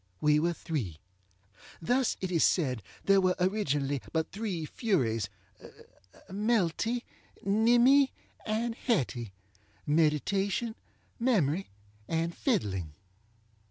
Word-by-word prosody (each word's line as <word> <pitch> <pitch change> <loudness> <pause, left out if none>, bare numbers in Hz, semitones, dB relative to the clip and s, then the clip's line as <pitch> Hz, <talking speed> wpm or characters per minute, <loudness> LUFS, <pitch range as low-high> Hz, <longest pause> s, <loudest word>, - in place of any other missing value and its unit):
We 150 +4 +4
were 170 +2 +1
three. 120 - -4 0.8
Thus 245 +8 +1
it 185 -1 -2
is 165 -3 +3
said 130 - +2 0.2
there 195 0 +5
were 185 -1 +2
originally 145 - 0
but 160 -1 -1
three 195 -6 -3
FuriesŌĆöMelty, 175 - -2 0.4
Nimmy, 240 +7 +5 0.3
and 225 +2 -1
HettyŌĆöMeditation, 150 - -1 0.5
Memory, 195 - +1 0.4
and 165 +1 -1
Fiddling. 95 - -1
170 Hz, 85 wpm, -30 LUFS, 135-215 Hz, 0.8 s, there